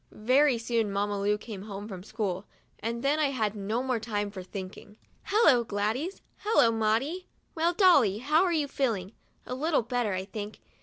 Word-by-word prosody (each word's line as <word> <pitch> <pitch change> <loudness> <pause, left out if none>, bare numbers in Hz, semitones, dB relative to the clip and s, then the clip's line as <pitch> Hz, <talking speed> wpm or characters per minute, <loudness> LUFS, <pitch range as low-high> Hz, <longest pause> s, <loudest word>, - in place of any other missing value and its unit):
Very 255 +4 +3
soon 230 -2 -1
Mamma 205 0 -1
Lu 205 +1 +2
came 210 -2 -8
home 205 -1 -7
from 190 -4 -7
school, 200 -2 -3 0.3
and 235 +2 -3
then 290 +3 +2
I 305 - +3
had 220 -7 -1
no 215 +5 -2
more 255 -3 0
time 205 -2 -3
for 195 -2 -7
thinking. 190 +2 -9 0.3
"Hello, 320 - +4
Gladys! 225 - -2
Hello, 410 - +3
Maudie! 230 +11 0 0.3
Well, 335 +2 +1
Dolly, 285 - +5
how 300 +8 +3
are 365 - +1
you 305 -4 +1
feeling? 225 -9 -1 0.3
A - - -5
little 295 0 +1
better, 240 -3 -1
I 185 0 -3
think. 205 +1 -7
225 Hz, 175 wpm, -28 LUFS, 205-275 Hz, 0.3 s, Dolly